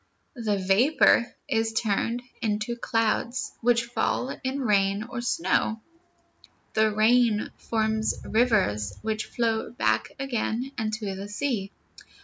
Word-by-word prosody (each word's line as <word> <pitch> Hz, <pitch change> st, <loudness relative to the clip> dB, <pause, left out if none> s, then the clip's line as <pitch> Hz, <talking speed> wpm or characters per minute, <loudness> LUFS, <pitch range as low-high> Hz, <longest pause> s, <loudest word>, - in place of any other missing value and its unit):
The 220 Hz, -5 st, -1 dB
vapor 230 Hz, +6 st, +4 dB, 0.2 s
is 225 Hz, -4 st, 0 dB
turned 225 Hz, +2 st, 0 dB, 0.2 s
into 215 Hz, +2 st, -1 dB
clouds, 230 Hz, +1 st, 0 dB
which 235 Hz, 0 st, +3 dB
fall 245 Hz, +2 st, -1 dB
in 265 Hz, +2 st, -2 dB
rain 200 Hz, -3 st, +2 dB
or 240 Hz, 0 st, -5 dB
snow. 220 Hz, 0 st, 0 dB, 0.9 s
The 220 Hz, 0 st, +3 dB
rain 220 Hz, 0 st, +3 dB
forms 220 Hz, -1 st, 0 dB
rivers, 195 Hz, -, +1 dB
which 220 Hz, 0 st, -2 dB
flow 225 Hz, -2 st, -1 dB
back 240 Hz, -, 0 dB
again 255 Hz, -1 st, -2 dB
into 215 Hz, -3 st, -3 dB
the 200 Hz, +2 st, -7 dB
sea. 210 Hz, -3 st, -2 dB
225 Hz, 115 wpm, -26 LUFS, 210-240 Hz, 0.9 s, vapor